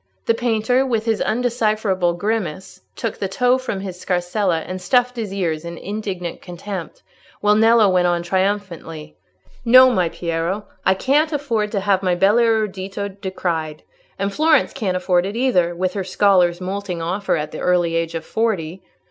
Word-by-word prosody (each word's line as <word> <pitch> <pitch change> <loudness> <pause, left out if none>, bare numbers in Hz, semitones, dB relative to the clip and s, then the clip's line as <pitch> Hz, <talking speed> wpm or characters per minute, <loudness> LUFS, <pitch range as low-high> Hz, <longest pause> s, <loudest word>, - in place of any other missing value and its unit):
The - - +3
painter, 235 +2 +1
with 230 -4 -1
his 225 -2 0
undecipherable 215 -6 0
grimace, 190 -2 -3
took 230 -3 -4
the 195 - -1
tow 250 +6 +2
from 210 -7 -4
his 185 -2 -7
scarsella 180 -1 0
and 185 +3 -6
stuffed 250 +6 +2
his 220 -5 -4
ears 170 -5 -2
in 170 0 -7
indignant 195 -4 -5
contempt, 180 0 -7 0.4
while 210 0 +3
Nello 225 0 +5
went 180 -2 +3
on 175 -1 0
triumphantly— 175 -4 -3 0.5
"No, 255 +2 +7
my 180 -7 +1
Piero, 170 +5 -3 0.2
I 190 - +5
can't 295 +9 +2
afford 235 -8 -1
to 200 - 0
have 195 -1 +2
my 180 -2 +1
bel 195 +5 +3
erudito 205 -4 0
decried; 175 -5 -4 0.3
and 195 0 -2
Florence 310 0 +3
can't 185 -4 -1
afford 180 -1 +1
it 200 +3 -4
either, 185 -9 +1
with 185 +1 -1
her 195 - -2
scholars 185 -2 +3
moulting 185 -1 -4
off 185 +5 -4
her - - +2
at 150 0 -4
the - - -7
early 175 -2 +1
age 165 0 -1
of 160 -1 -4
forty. 190 -6 -2
195 Hz, 170 wpm, -20 LUFS, 175-220 Hz, 0.5 s, No